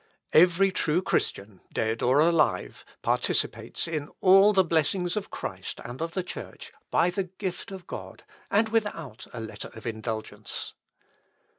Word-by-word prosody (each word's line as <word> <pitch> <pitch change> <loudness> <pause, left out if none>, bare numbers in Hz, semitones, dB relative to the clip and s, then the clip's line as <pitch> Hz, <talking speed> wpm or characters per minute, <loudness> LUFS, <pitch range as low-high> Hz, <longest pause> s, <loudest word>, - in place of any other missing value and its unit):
"Every 180 +3 +6
true 170 0 +1
Christian, 100 - -1
dead 110 +1 -1
or 130 +3 +4
alive, 155 - +2 0.2
participates - - 0
in 155 -3 -3
all 195 +2 +7
the 190 -2 +5
blessings 170 +2 +1
of 210 - -3
Christ - - -5
and 120 +5 -7
of 165 +1 -3
the 185 - 0
Church - - -8 0.2
by 180 - +3
the 190 +1 -1
gift 185 +1 -5
of 190 -2 -8
God - - -8 0.3
and 220 +2 +3
without 205 - -2
a 120 - -6
letter 110 -1 -6
of 110 - -11
indulgence. 110 -1 -4
170 Hz, 145 wpm, -27 LUFS, 120-190 Hz, 0.3 s, all